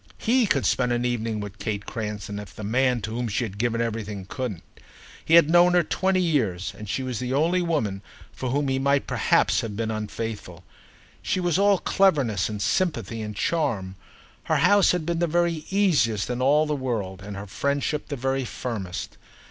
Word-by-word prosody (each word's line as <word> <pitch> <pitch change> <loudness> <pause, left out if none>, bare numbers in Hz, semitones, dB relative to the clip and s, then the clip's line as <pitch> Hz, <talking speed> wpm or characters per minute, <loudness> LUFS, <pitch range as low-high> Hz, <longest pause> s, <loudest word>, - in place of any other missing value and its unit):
He 240 0 +2
could 140 -8 +1
spend 125 -1 +2
an 120 0 0
evening 115 -3 -1
with 105 0 -8
Kate 100 0 -3
Creston, 105 -2 -5
if 105 -2 -10
the 110 - -7
man 125 +3 +1
to 110 - -5
whom 120 +1 -2
she 110 +3 -1
had 100 -3 -6
given 115 0 0
everything 105 -4 -3
couldn't. 120 - -5 0.6
He 165 - +4
had 170 -3 +7
known 175 +2 +5
her 175 -1 +4
twenty 190 +3 +1
years, 110 - 0
and 105 0 -9
she 130 - -1
was 125 -4 -3
the 125 0 -2
only 170 +5 +2
woman 130 - -1 0.3
for 130 - -4
whom 140 +2 0
he 135 0 0
might 140 +1 +2
perhaps - - +2
have 110 -3 -5
been 110 +1 -2
unfaithful. 105 -4 -5 0.6
She - - -1
was 175 0 +1
all 200 0 +5
cleverness 140 - +2
and 105 -1 -3
sympathy 120 - -1
and 105 -1 -5
charm; 105 - -1 0.5
her - - +1
house 205 -1 +5
had 180 -3 -1
been 170 0 -1
the 175 - +2
very 170 -1 0
easiest 145 - +2
in 125 +1 -3
all 145 +4 +4
the 150 -1 -1
world 110 -8 -3
and 100 0 -7
her 100 - -6
friendship 140 +7 -2
the 145 - -4
very 135 +1 -1
firmest. 110 -7 -5
125 Hz, 195 wpm, -25 LUFS, 105-155 Hz, 0.6 s, had